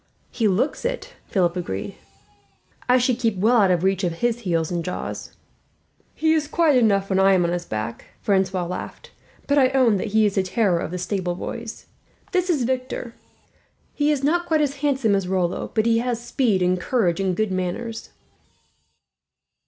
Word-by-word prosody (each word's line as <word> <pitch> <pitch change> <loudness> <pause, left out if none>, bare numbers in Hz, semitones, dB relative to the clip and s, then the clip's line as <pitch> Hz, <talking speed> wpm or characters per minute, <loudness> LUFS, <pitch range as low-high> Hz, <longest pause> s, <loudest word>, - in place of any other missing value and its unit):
"He 230 -3 +1
looks 205 +9 0
it," - - -3
Philip 175 -3 +1
agreed. 100 - -4 1.0
"I 250 - +6
should 250 -1 +1
keep 225 -5 0
well 225 +6 +3
out 200 -4 +4
of 175 -1 +1
reach 190 0 +1
of 175 -2 0
his 240 +6 -1
heels 170 -7 -1
and 170 -1 -2
jaws." 180 - -5 0.8
"He 315 0 +2
is 310 -2 0
quiet 320 -2 +3
enough 200 -4 +2
when 190 - +2
I 195 0 +5
am 180 -2 +3
on 170 - 0
his 175 0 -3
back," 110 +2 -4
Francois 190 -3 +1
laughed; 180 +1 -7 0.3
"but 285 0 +3
I 260 -2 +5
own 245 -6 +4
that 190 - -3
he 220 +1 +3
is 205 - +1
the 195 - +2
terror 185 -2 +1
of - - -3
the 180 - -4
stable 180 -1 -2
boys. 230 +4 -7 0.5
"This 365 -1 0
is 300 -8 +2
Victor. 255 -1 -3 0.8
He 295 0 +1
is 285 -2 -1
not 345 +4 +1
quite 315 -1 +2
as 285 -1 -1
handsome 270 -6 +1
as 195 -2 0
Rollo, 180 -2 -1
but 220 -1 +2
he 230 0 +3
has 240 -1 -1
speed 235 -5 0
and 180 0 +1
courage 190 -9 +1
and 190 -2 0
good 215 -2 0
manners." 185 +5 -4
215 Hz, 185 wpm, -23 LUFS, 185-255 Hz, 1.0 s, I